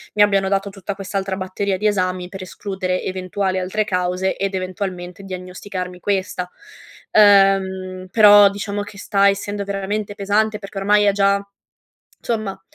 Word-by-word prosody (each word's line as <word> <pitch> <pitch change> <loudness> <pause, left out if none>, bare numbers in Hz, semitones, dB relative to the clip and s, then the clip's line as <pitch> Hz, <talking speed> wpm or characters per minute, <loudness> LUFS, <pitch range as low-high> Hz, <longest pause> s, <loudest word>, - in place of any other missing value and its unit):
mi 210 - +3
abbiano 195 -2 +2
dato 195 0 0
tutta 195 0 -6
quest'altra 195 0 -3
batteria 190 +1 -2
di 210 +3 +1
esami 185 -3 -1
per 195 0 -8
escludere 185 -1 -3
eventuali 185 +1 -2
altre 190 +4 -1
cause 180 -1 -1
ed 195 0 -2
eventualmente 185 0 -5
diagnosticarmi 185 0 -6
questa, 185 -2 -2 0.6
ehm. 190 -2 +4
Però 205 -2 +8
diciamo 205 0 -4
che 205 0 -12
sta 200 -1 +3
essendo 205 +1 -3
veramente 200 +1 -3
pesante, 210 +1 +1
perché 195 -1 -10
ormai 205 +1 +3
è 200 - +5
già 200 0 +2 0.8
insomma, 215 -5 -3
195 Hz, 140 wpm, -20 LUFS, 185-205 Hz, 0.8 s, Però